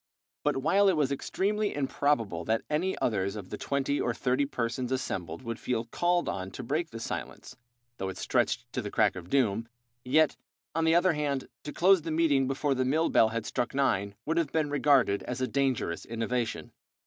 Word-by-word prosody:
But - - +1
while 195 +9 +4
it 180 - +2
was 140 -3 +1
extremely 205 +8 -1
improbable 130 - 0
that 110 +1 0
any 180 +6 0
others 100 -3 0
of 100 -3 -7
the - - -2
twenty 140 +1 0
or 120 -1 0
thirty 130 +3 +1
persons 125 0 -2
assembled 130 -4 -3
would 115 -1 -4
feel 115 -2 -1
called 175 +8 +1
on 95 0 -3
to 130 - -6
break 155 +7 -1
the 115 - -8
silence, 120 - -6 0.4
though 95 - -3
it 95 - -7
stretched 120 - 0
to 125 - -1
the 105 - -5
crack 105 -1 +2
of 90 -1 -8
doom, 115 -5 +1 0.4
yet, 155 +4 +3 0.4
on 165 +1 +1
the 160 +1 +4
other 175 0 +4
hand, 145 -3 -2 0.2
to 150 - -4
close 185 +2 +4
the 165 - -5
meeting 155 -4 +2
before 135 +1 0
the 130 -1 0
mill 155 +6 +2
bell 110 - +5
had 115 -1 -3
struck 125 +1 -2
nine 100 -7 +1
would 160 +2 0
have 165 -4 +1
been 155 -2 0
regarded 140 -8 +3
as 125 - -5
a 130 - +1
dangerous 130 -12 0
innovation. 115 +1 -2
135 Hz, 195 wpm, -29 LUFS, 115-155 Hz, 0.4 s, bell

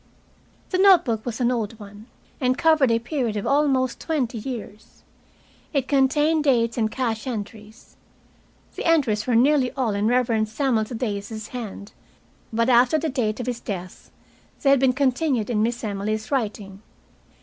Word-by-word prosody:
The 370 - 0
note 385 -2 +6
book 225 -3 -2
was 230 0 -4
an 245 -1 +2
old 225 -2 -3
one, 205 +1 -12 0.3
and 255 0 +1
covered 315 -5 +4
a 230 - +3
period 235 -2 -2
of 205 - -3
almost 270 -3 +1
twenty 260 -8 -2
years. 215 -3 -8 0.7
It 275 -3 0
contained 295 +3 +2
dates 230 -4 +2
and 220 -2 0
cash 230 -2 -3
entries. 215 -2 -8 0.8
The - - -6
entries 255 -10 +2
were 245 - +2
nearly 260 +1 +3
all 250 -6 -1
in 200 +1 0
the - - +2
Reverend 230 -3 +1
Samuel 230 -2 0
Thaddeus's 215 -2 -5
hand, 215 -4 -7 0.6
but 230 +1 +1
after 250 +4 +4
the 315 +1 -2
date 235 -5 -1
of 245 - -3
his 245 -2 -3
death 185 -5 -7 0.5
they 275 - +5
had 275 - +5
been 260 -1 +3
continued 260 -3 0
in 210 -2 +1
Miss 235 +2 -1
Emily's 215 +2 -3
writing. 205 -6 -3
240 Hz, 160 wpm, -23 LUFS, 215-270 Hz, 0.8 s, note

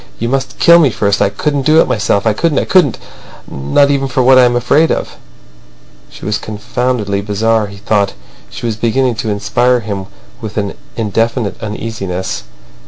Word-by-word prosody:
You 115 - -2
must 135 +1 -2
kill 170 0 +6
me 150 -5 +4
first. 100 -2 0
I - - +3
couldn't 145 -2 -1
do 155 +3 +4
it - - +4
myself—I 105 +1 +1
couldn't, 155 +5 0
I - - +1
couldn't—not 140 - 0
even 135 -1 0
for 130 0 0
what 130 +1 +6
I 125 - +6
am 120 0 +1
afraid 140 +7 +2
of." - - -3 0.9
She - - -12
was 105 0 -1
confoundedly 105 -1 -2
bizarre, 110 +1 0
he 100 0 -11
thought. 100 -1 0 0.4
She - - -8
was 110 -2 -2
beginning 125 +3 +1
to 110 0 -3
inspire 120 +5 +1
him 100 -3 -5 0.3
with 110 -1 -7
an 100 -2 -2 0.2
indefinite 115 +1 -1
uneasiness. 100 - -4
115 Hz, 170 wpm, -14 LUFS, 105-130 Hz, 0.9 s, kill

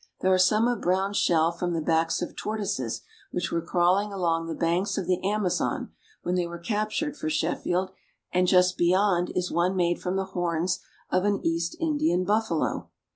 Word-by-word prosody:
There 190 0 +3
are 185 - +3
some 215 +5 +4
of 245 -3 -1
brown 190 +3 +1
shell 165 -4 +3
from 175 +1 -3
the 165 - 0
backs 165 +2 +1
of - - -6
tortoises 215 -1 -3 0.3
which 180 - -3
were 170 - 0
crawling 185 +5 +2
along 165 -4 0
the 165 - -3
banks 175 +4 0
of 195 - -1
the 180 +1 0
Amazon 200 -2 -1 0.3
when 175 - -1
they 180 -1 0
were 170 0 -7
captured 215 - -2
for 155 - -4
Shef 155 +2 0
field, 185 +1 -1 0.4
and 180 0 +3
just 180 0 +4
beyond 180 0 +3
is 180 0 -1
one 175 +3 +1
made 175 -1 +1
from 180 +1 -2
the 195 0 0
horns 175 0 0 0.3
of 185 - +2
an 205 -1 +1
East 165 +1 0
Indian 300 - +1
buffalo. 210 -5 0
180 Hz, 185 wpm, -26 LUFS, 170-200 Hz, 0.4 s, some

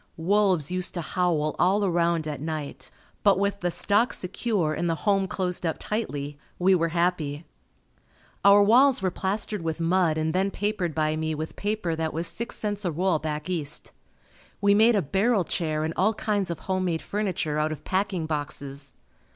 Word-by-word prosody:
Wolves 185 -3 +2
used 185 0 -3
to 175 - -1
howl 165 -3 0
all 195 +3 +3
around 170 -3 +1
at 150 -2 -4
night 155 -2 -5 0.3
but 200 -3 +4
with 200 +1 0
the 175 - 0
stock 210 +7 +2
secure 190 -3 -1
and 175 +2 -1
the 165 - +1
home 195 -2 +3
closed 185 -3 -2
up 165 -2 -1
tightly, 145 -10 -4 0.2
we 185 +2 +4
were 165 -2 +2
happy. 165 -3 -1 1.0
Our 200 +1 +7
walls 245 +2 +5
were 185 - +1
plastered 200 +2 -2
with 165 0 -3
mud 165 -1 +2
and 160 0 0
then 190 +2 +1
papered 200 -5 -2
by 155 -1 +1
me 160 0 -2
with 155 +1 -5
paper 205 -5 -2
that 160 -1 -2
was 165 +2 -1
six 235 +7 -4
cents 210 -1 -3
a 175 - 0
roll 170 0 +1
back 150 +1 -4
east. 160 -6 -3 0.7
We 200 0 +4
made 220 +3 +5
a 200 - +2
barrel 195 - +2
chair 155 -2 -1
and 160 +1 -2
all 210 +4 +2
kinds 205 -4 -1
of 170 -3 -4
home 185 -1 -1
made 165 -3 -1
furniture 185 -7 -2
out 155 +1 +1
of 155 - -6
packing 190 -3 -1
boxes. 140 -2 -5
180 Hz, 185 wpm, -26 LUFS, 155-200 Hz, 1.0 s, Our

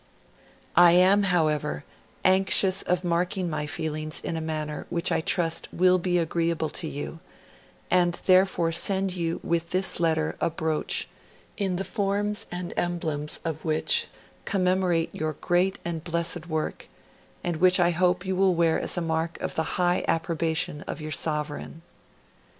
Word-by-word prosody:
I 175 -1 +7
am, 185 +3 +5
however, 155 - 0 0.4
anxious 190 0 +5
of 180 0 -1
marking 175 +1 -1
my 150 -1 -2
feelings 155 0 -3
in - - -4
a 160 - -3
manner 155 -1 -4
which 170 -1 0
I - - +1
trust 165 0 +1
will 185 +1 +3
be 180 0 0
agreeable 165 -1 0
to 170 - -3
you, 150 +2 -6 0.7
and 175 -1 +3
therefore, 185 -3 +3
send 190 +2 0
you 170 -1 -2
with 170 0 -1
this 185 0 +1
letter 160 -2 +1
a - - +2
brooch, 160 -1 -2 0.5
the 190 -2 -1
form 205 0 -1 0.2
and 175 0 -5
emblems 160 -4 -2
of 160 -1 -4
which 465 - +1 0.4
commemorate 185 -3 +1
your 155 0 -2
great 180 +5 0
and 165 -2 -4
blessed 170 0 -2
work, 155 -2 -3 0.6
and 175 -2 -2
which 185 +2 +5
I 175 0 +4
hope 180 +1 +1
you 190 0 -1
will 190 -1 +3
wear 165 -1 +2
as - - +1
a - - 0
mark 165 0 -2
of - - -3
the 160 - 0
high 180 0 +2
approbation 165 -3 -1
of - - -5
your 155 0 -6
Sovereign! 150 +1 -3
170 Hz, 150 wpm, -26 LUFS, 160-185 Hz, 0.7 s, I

